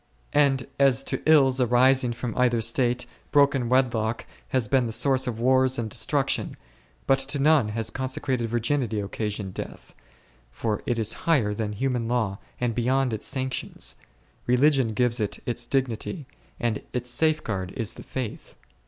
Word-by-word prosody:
And 135 -4 +3
as 135 -1 +4
to - - -3
ills 135 -4 +5
arising 125 +1 +4
from 120 -1 -5
either 125 -2 +2
state, 120 +2 0 0.2
broken 140 -4 +3
wedlock 120 -3 +1 0.2
has 130 -4 0
been 130 +1 +2
the - - -4
source 130 +3 +2
of 115 -2 -3
wars 130 +1 +3
and 110 -2 -3
destruction, - - 0 0.5
but 135 0 +3
to 135 +2 0
none 145 -4 +4
has 110 +1 -3
consecrated 130 -3 -2
virginity 120 -1 0
occasioned 100 -1 -4
death, - - -8 0.6
for 110 -2 -2
it 120 - 0
is 110 -1 +2 0.2
higher 120 -11 +3
than 105 0 -3
human 125 +1 -1
law 110 -5 -1 0.2
and 120 -2 0
beyond 125 +1 +1
its 110 - -2
sanctions; 130 -1 -3 0.5
religion 130 -2 +3
gives 125 0 +1
it 105 -2 -2
its 120 0 -2
dignity, 135 - -2 0.3
and 115 -3 -1
its 125 0 -2
safeguard 120 - 0
is 115 -5 -2
the - - -11
Faith. 130 -3 -6
125 Hz, 155 wpm, -25 LUFS, 115-135 Hz, 0.6 s, ills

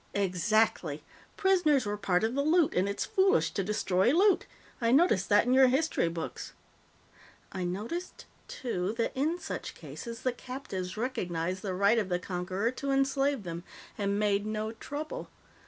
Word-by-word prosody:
"Exactly. 190 -5 +1 0.3
Prisoners 355 - +3
were 205 0 -1
part 195 -2 +1
of 225 +2 +1
the 280 - +1
loot, 315 +2 +3
and 185 +2 +1
it's 200 - -2
foolish 385 +1 +3
to 195 - -1
destroy 190 0 +1
loot. 380 +3 +3 0.3
I 230 0 +2
noticed 260 - +3
that 205 +1 +5
in 250 - +2
your 265 0 +7
history 270 - +1
books. 165 -1 -5 1.0
I 185 -2 -3
noticed, 220 - -5 0.2
too, 230 - -3
that 230 - 0
in 305 +6 0
such - - -6
cases, 230 -1 -8
the 255 - +2
captives 240 -8 -6
recognized 185 -7 -2
the 190 -3 -3
right 200 +4 +4
of 200 -3 -2
the 180 - +1
conqueror 185 +4 -2
to 275 +2 -5
enslave 275 -2 +1
them, 170 -1 -6 0.3
and 200 -1 -1
made 205 -1 +1
no 215 +1 -3
trouble. 300 - -6
220 Hz, 160 wpm, -30 LUFS, 190-275 Hz, 1.0 s, your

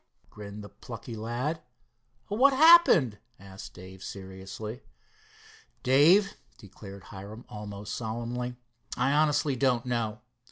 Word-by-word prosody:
grinned 105 0 -9
the 100 - -10
plucky 115 +3 -9
lad. 120 +9 -3 0.7
"What 260 +7 +4
happened?" 275 - +6 0.2
asked 95 0 -11
Dave 95 +1 -12
seriously. 95 +5 -8 1.0
"Dave," 165 +10 +5 0.2
declared 100 0 -12
Hiram 105 +4 -10
almost 105 -1 -7
solemnly, 120 +2 -4 0.4
"I 130 +2 +2
honestly 150 -2 +2
don't 125 -2 +1
know. 115 -3 -2
115 Hz, 105 wpm, -28 LUFS, 100-135 Hz, 1.0 s, happened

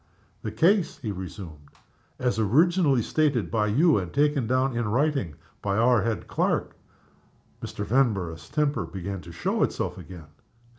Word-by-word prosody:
"The 110 - -4
case," 170 - +2
he 110 -6 -4
resumed, 90 -6 -8 0.5
"as 125 -4 -1
originally 145 - +3
stated 145 -7 0
by 105 -2 +1
you, 145 +5 +4
and 90 -2 -5
taken 145 - +1
down 130 +1 +1
in 120 -2 -1
writing 130 - 0 0.3
by 100 -1 -1
our 120 0 +4
head 115 0 -2
clerk." - - -1 0.9
Mr. 105 - -5
Vanborough's 100 - 0
temper 145 - 0
began 95 +1 -5
to 85 - -11
show 80 - -2
itself - - -1
again. 90 -4 -10
115 Hz, 145 wpm, -26 LUFS, 95-140 Hz, 0.9 s, you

